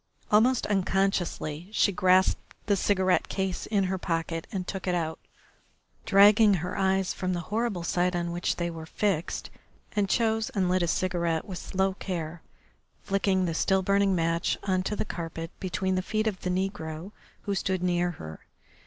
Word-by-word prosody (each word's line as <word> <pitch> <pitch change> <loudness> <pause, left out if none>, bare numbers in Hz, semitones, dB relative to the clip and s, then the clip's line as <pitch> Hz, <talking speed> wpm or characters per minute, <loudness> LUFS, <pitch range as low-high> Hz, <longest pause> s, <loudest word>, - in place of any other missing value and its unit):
Almost 230 +4 +4
unconsciously 190 -4 0
she 215 - +3
grasped 185 0 +2
the 205 - +3
cigarette 190 -1 +2
case 190 -2 -2
in 205 -3 +2
her 190 0 -1
pocket 165 -1 -2
and 185 -2 -3
took 195 -1 -5
it 180 - +2
out, 160 -2 -2 0.9
dragging 205 +1 +7
her 175 0 -3
eyes 190 -1 +1
from 185 -1 -2
the 175 - -1
horrible 215 -5 -1
sight 180 +1 +1
on 170 0 -1
which 175 +1 -1
they 170 -1 -2
were 160 -1 -8
fixed, 185 -3 -1 0.4
and 200 -2 +1
chose 225 -1 +1
and 185 -3 +2
lit 185 0 +2
a 175 - +1
cigarette 170 -2 0
with 185 -4 -6
slow 190 0 0
care, 170 -4 -5 0.6
flicking 195 -1 +1
the 165 - -1
still 190 +3 +2
burning 200 0 +3
match 165 0 0
on 185 -2 +1
to 200 +3 -2
the - - -2
carpet 165 -2 -5
between 190 0 -1
the 185 - +1
feet 215 +3 -1
of 205 -4 -1
the 180 - -2
negro 180 -2 -3 0.3
who 200 - -1
stood 190 -2 -1
near 175 -1 +1
her. 80 - -8
185 Hz, 170 wpm, -27 LUFS, 175-195 Hz, 0.9 s, dragging